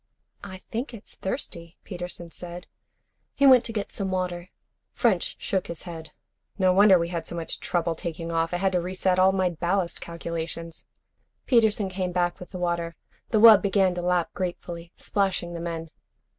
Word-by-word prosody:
"I 190 Hz, -2 st, -7 dB
think 235 Hz, +6 st, -5 dB
it's 205 Hz, -, -10 dB
thirsty," 175 Hz, -, -5 dB
Peterson 175 Hz, -2 st, -7 dB
said. 175 Hz, +1 st, -8 dB, 0.7 s
He 280 Hz, -, +3 dB
went 255 Hz, -3 st, +8 dB
to -, -, -3 dB
get 210 Hz, -3 st, -3 dB
some 195 Hz, -2 st, -3 dB
water. 180 Hz, -1 st, -2 dB, 0.4 s
French -, -, +1 dB
shook 190 Hz, -2 st, -2 dB
his 170 Hz, -, -6 dB
head. 165 Hz, -3 st, -8 dB, 0.5 s
"No 185 Hz, -2 st, +4 dB
wonder 195 Hz, 0 st, +7 dB
we 170 Hz, 0 st, -1 dB
had 170 Hz, -2 st, -4 dB
so -, -, -4 dB
much 165 Hz, -1 st, -3 dB
trouble 170 Hz, -1 st, 0 dB
taking 165 Hz, 0 st, -5 dB
off. 165 Hz, 0 st, 0 dB
I 175 Hz, -, 0 dB
had 190 Hz, +1 st, +1 dB
to 180 Hz, -1 st, +1 dB
reset 185 Hz, +1 st, 0 dB
all 190 Hz, +1 st, +6 dB
my 185 Hz, -2 st, +1 dB
ballast 175 Hz, +2 st, -1 dB
calculations." 170 Hz, 0 st, -6 dB, 0.6 s
Peterson 220 Hz, -4 st, +3 dB
came 185 Hz, -1 st, -3 dB
back 175 Hz, -1 st, 0 dB
with 180 Hz, -, -10 dB
the 185 Hz, -, -7 dB
water. 170 Hz, -1 st, -2 dB, 0.3 s
The 220 Hz, -, +2 dB
wub 220 Hz, -2 st, +9 dB
began 195 Hz, -2 st, +2 dB
to 175 Hz, -, -3 dB
lap 175 Hz, -1 st, +1 dB
gratefully, 175 Hz, -2 st, -5 dB
splashing 190 Hz, -3 st, -1 dB
the 170 Hz, -, -5 dB
men. 165 Hz, -1 st, -5 dB
180 Hz, 175 wpm, -26 LUFS, 170-190 Hz, 0.7 s, wub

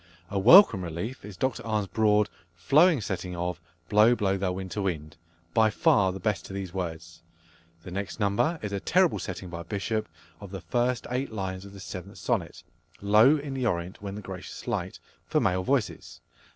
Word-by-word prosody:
A 100 Hz, -, 0 dB
welcome 115 Hz, -, +8 dB
relief 85 Hz, +10 st, -5 dB
is 100 Hz, -2 st, -10 dB
Dr 130 Hz, -2 st, -1 dB
Arne's 110 Hz, -2 st, -1 dB
broad, 105 Hz, 0 st, +3 dB, 0.3 s
flowing 145 Hz, -, +4 dB
setting 90 Hz, -2 st, -4 dB
of 85 Hz, -1 st, -3 dB, 0.3 s
"Blow, 110 Hz, +3 st, +5 dB
blow, 100 Hz, -4 st, 0 dB
thou 95 Hz, -1 st, -1 dB
winter 95 Hz, +2 st, -4 dB
wind," 80 Hz, -5 st, -3 dB, 0.4 s
by 110 Hz, -1 st, +4 dB
far 100 Hz, -2 st, +3 dB
the 95 Hz, -, -7 dB
best 105 Hz, -1 st, -1 dB
to -, -, -9 dB
these 95 Hz, -2 st, -5 dB
words. 85 Hz, -2 st, -5 dB, 0.6 s
The 90 Hz, -, -9 dB
next 100 Hz, +3 st, -5 dB
number 105 Hz, +11 st, +1 dB
is 105 Hz, -, -3 dB
a 100 Hz, -, -2 dB
terrible 180 Hz, -, +2 dB
setting 95 Hz, -1 st, -6 dB
by 85 Hz, 0 st, -5 dB
Bishop 100 Hz, +3 st, -3 dB, 0.3 s
of 100 Hz, -, -9 dB
the 95 Hz, -1 st, -7 dB
first 120 Hz, +3 st, 0 dB
eight 130 Hz, +1 st, -2 dB
lines 95 Hz, -2 st, -4 dB
of 100 Hz, -, -12 dB
the -, -, -11 dB
7th 95 Hz, 0 st, -8 dB
Sonnet, -, -, -2 dB, 0.4 s
"Low 110 Hz, +9 st, +5 dB
in 140 Hz, -1 st, -5 dB
the 130 Hz, -2 st, -1 dB
Orient 90 Hz, -2 st, -3 dB
when 100 Hz, -1 st, -5 dB
the 105 Hz, -, -7 dB
gracious 95 Hz, -1 st, -8 dB
light," -, -, -2 dB, 0.3 s
for -, -, +2 dB
male 95 Hz, 0 st, +1 dB
voices. 130 Hz, 0 st, -2 dB
100 Hz, 185 wpm, -27 LUFS, 90-110 Hz, 0.6 s, welcome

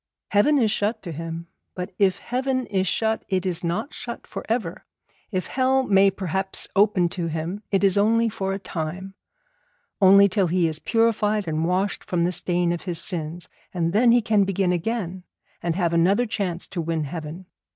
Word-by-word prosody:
Heaven 270 Hz, +9 st, +4 dB
is 225 Hz, -5 st, +2 dB
shut 215 Hz, +1 st, -1 dB
to 175 Hz, -, -6 dB
him. 165 Hz, +1 st, -6 dB, 0.3 s
But 180 Hz, 0 st, -5 dB
if 195 Hz, -2 st, +3 dB
heaven 255 Hz, +1 st, -2 dB
is 190 Hz, -3 st, -1 dB
shut 220 Hz, +3 st, 0 dB
it 190 Hz, -1 st, 0 dB
is 180 Hz, -1 st, -2 dB
not 200 Hz, -, -2 dB
shut 235 Hz, -1 st, -7 dB
for -, -, -7 dB
ever; 220 Hz, -7 st, -2 dB, 0.5 s
if 185 Hz, -4 st, -2 dB
hell 265 Hz, 0 st, +1 dB
may 195 Hz, -4 st, +5 dB
perhaps 190 Hz, 0 st, -2 dB
open 200 Hz, -3 st, +4 dB
to 170 Hz, -1 st, -3 dB
him 165 Hz, +5 st, -4 dB
it 195 Hz, -1 st, +1 dB
is 195 Hz, 0 st, +4 dB
only 230 Hz, +3 st, +3 dB
for 195 Hz, -3 st, -3 dB
a 195 Hz, -, -2 dB
time, 185 Hz, +1 st, -5 dB, 0.9 s
only 200 Hz, +1 st, +7 dB
till 190 Hz, -1 st, +1 dB
he 175 Hz, 0 st, +2 dB
is 155 Hz, -1 st, -4 dB
purified 215 Hz, -3 st, +1 dB
and 160 Hz, 0 st, -1 dB
washed 185 Hz, +3 st, 0 dB
from 175 Hz, -2 st, -1 dB
the 175 Hz, -, +1 dB
stain 175 Hz, -1 st, +1 dB
of 175 Hz, -, -4 dB
his 175 Hz, -3 st, -2 dB
sins; 170 Hz, -2 st, -4 dB, 0.3 s
and 170 Hz, -1 st, 0 dB
then 235 Hz, +3 st, +5 dB
he 240 Hz, -1 st, +4 dB
can 210 Hz, -2 st, +3 dB
begin 195 Hz, -1 st, 0 dB
again, 185 Hz, 0 st, -2 dB, 0.4 s
and 170 Hz, -1 st, -1 dB
have 170 Hz, -3 st, 0 dB
another 190 Hz, +8 st, +3 dB
chance 190 Hz, -6 st, -3 dB
to 175 Hz, -, -3 dB
win 165 Hz, -1 st, -1 dB
heaven. 160 Hz, +4 st, -6 dB
190 Hz, 185 wpm, -24 LUFS, 170-210 Hz, 0.9 s, only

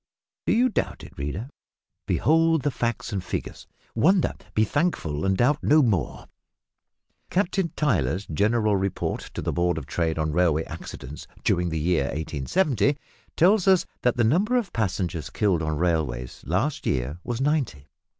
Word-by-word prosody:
Do -, -, +4 dB
you 245 Hz, +3 st, +4 dB
doubt -, -, -2 dB
it, -, -, -12 dB
reader? 75 Hz, -, -4 dB, 0.6 s
Behold 165 Hz, -1 st, +3 dB
the 145 Hz, -, +1 dB
facts 120 Hz, -2 st, -2 dB
and 95 Hz, -2 st, -2 dB
figures -, -, -5 dB, 0.3 s
wonder, 175 Hz, -, +3 dB, 0.2 s
be 110 Hz, -, +4 dB
thankful 105 Hz, -, -1 dB
and 95 Hz, 0 st, +2 dB
doubt 140 Hz, +6 st, +2 dB
no 150 Hz, +1 st, +5 dB
more! 95 Hz, -, +1 dB
A -, -, -12 dB
"Blue -, -, -13 dB
Book" -, -, -23 dB, 1.0 s
(Captain 185 Hz, -2 st, 0 dB
Tyler's 95 Hz, -, +1 dB
General 105 Hz, +5 st, +1 dB
Report 95 Hz, -1 st, -1 dB, 0.2 s
to -, -, -3 dB
the -, -, -1 dB
Board 85 Hz, -1 st, +1 dB
of 75 Hz, -, -5 dB
Trade 80 Hz, +1 st, -1 dB
on 80 Hz, -1 st, 0 dB
Railway 80 Hz, -1 st, +2 dB
Accidents 75 Hz, -1 st, -8 dB, 0.2 s
during 90 Hz, 0 st, +1 dB
the 80 Hz, -, -2 dB
year 80 Hz, -2 st, +1 dB
1870) 100 Hz, -, 0 dB, 0.4 s
tells 190 Hz, +3 st, +4 dB
us 190 Hz, -2 st, +5 dB, 0.2 s
that 125 Hz, -1 st, +1 dB
the 120 Hz, -, +3 dB
number 195 Hz, -, +3 dB
of 235 Hz, -5 st, -2 dB
passengers 90 Hz, -6 st, -2 dB
killed 95 Hz, -6 st, +1 dB
on 80 Hz, -1 st, -1 dB
railways 75 Hz, -8 st, -1 dB
last 115 Hz, -, -1 dB
year 65 Hz, +5 st, -1 dB
was 120 Hz, -1 st, -3 dB
ninety. 135 Hz, -, -1 dB
100 Hz, 165 wpm, -25 LUFS, -, 1.0 s, no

